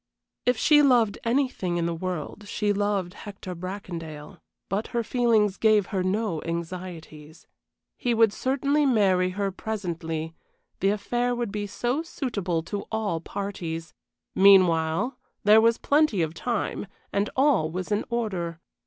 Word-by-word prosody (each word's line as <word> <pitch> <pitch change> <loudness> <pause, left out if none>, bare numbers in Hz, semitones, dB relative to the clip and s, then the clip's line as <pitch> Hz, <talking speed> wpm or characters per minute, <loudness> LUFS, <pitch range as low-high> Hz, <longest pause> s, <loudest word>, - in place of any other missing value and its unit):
If 250 -1 +3
she 295 +5 +5
loved 240 -7 +3
anything 230 -8 0
in 170 - 0
the 170 - -1
world 185 +3 -5
she 205 0 0
loved 200 -3 -1
Hector 200 -3 -8
Bracondale, 170 -4 -7 0.3
but 200 +3 -2
her 235 - +1
feelings 225 -4 +2
gave 215 -3 +4
her 190 - +1
no 190 -3 -1
anxieties. 165 -2 -7 0.5
He 240 -1 0
would 225 -2 +4
certainly 280 +4 +1
marry 190 -7 +3
her 200 -1 0
presently, 165 -6 -4 0.5
the 195 - +2
affair 240 +4 0
would 240 -4 -2
be 205 0 -3
so 245 +8 -1
suitable 200 - -3
to 200 +4 -5
all 215 -7 -1
parties; 170 -5 -5 0.4
meanwhile, 185 +2 +4 0.2
there 215 +2 +7
was 230 0 +4
plenty 285 - +2
of 160 0 -3
time, 210 +2 -2 0.3
and 200 +1 +1
all 265 - +3
was 185 +4 -5
in 205 +1 +1
order. 190 -8 -2
200 Hz, 140 wpm, -26 LUFS, 175-230 Hz, 0.5 s, there